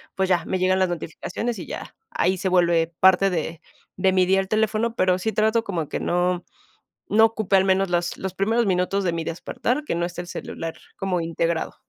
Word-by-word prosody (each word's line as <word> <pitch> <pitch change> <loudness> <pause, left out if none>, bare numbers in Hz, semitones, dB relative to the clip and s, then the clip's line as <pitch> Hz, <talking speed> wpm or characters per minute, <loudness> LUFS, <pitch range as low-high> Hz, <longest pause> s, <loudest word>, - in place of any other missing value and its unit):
pues 190 -1 0
ya, 175 -2 +2
me 185 - -1
llegan 185 +1 +2
las 185 -1 +2
notificaciones 175 +8 -4
y - - -6
ya, - - -7
ahí 185 +2 +1
se 190 +1 -1
vuelve 170 -2 +2
parte 190 +1 +6
de 165 -2 -3 0.4
de 190 0 +2
mi 185 -1 +4
día 190 +1 +3
al 190 - -2
teléfono, 220 +2 0
pero 185 -2 +2
sí 220 +3 -2
trato 220 +1 +2
como 170 -7 -3
que - - -3
no, 180 0 0 0.6
no 220 +2 +6
ocupe 220 -3 +1
al 190 - +3
menos 190 0 +2
las 175 0 -1
los 190 -1 -4
primeros 225 +4 +1
minutos 190 +1 +1
de 175 -2 0
mi 165 -1 -2
despertar, 245 - -2
que - - -2
no 170 0 0
esté 175 0 -5
el 175 - -10
celular 165 -2 -6 0.2
como 190 -3 -1
integrado. 165 0 -1
185 Hz, 210 wpm, -23 LUFS, 175-195 Hz, 0.6 s, parte